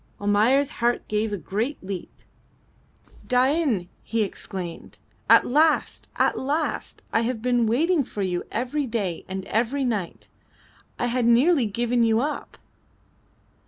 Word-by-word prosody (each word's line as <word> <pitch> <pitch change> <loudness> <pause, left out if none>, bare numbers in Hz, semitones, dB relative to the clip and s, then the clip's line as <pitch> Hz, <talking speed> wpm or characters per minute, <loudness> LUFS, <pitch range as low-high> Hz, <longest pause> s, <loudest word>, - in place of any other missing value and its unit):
Almayer's 220 +8 +3
heart 240 +1 +1
gave 215 +1 -1
a 205 - -2
great 220 - -3
leap. 185 -2 -5 1.2
"Dain!" 255 - +2
he 225 -1 -1
exclaimed. 185 -3 -7 0.3
"At - - +7
last! 305 +4 +2
at - - +1
last! 295 +4 -2
I 225 - +3
have 230 -1 -2
been 245 -2 +2
waiting 305 +7 +2
for 210 -4 -5
you 180 -2 -1
every 260 +5 -2
day 200 -8 -2
and 190 0 -5
every 245 +6 0
night. 215 -8 -3 0.7
I - - -1
had 245 0 +1
nearly 255 +2 +4
given 240 +3 0
you 225 -1 +3
up." 295 +4 -4
235 Hz, 130 wpm, -24 LUFS, 210-265 Hz, 1.2 s, At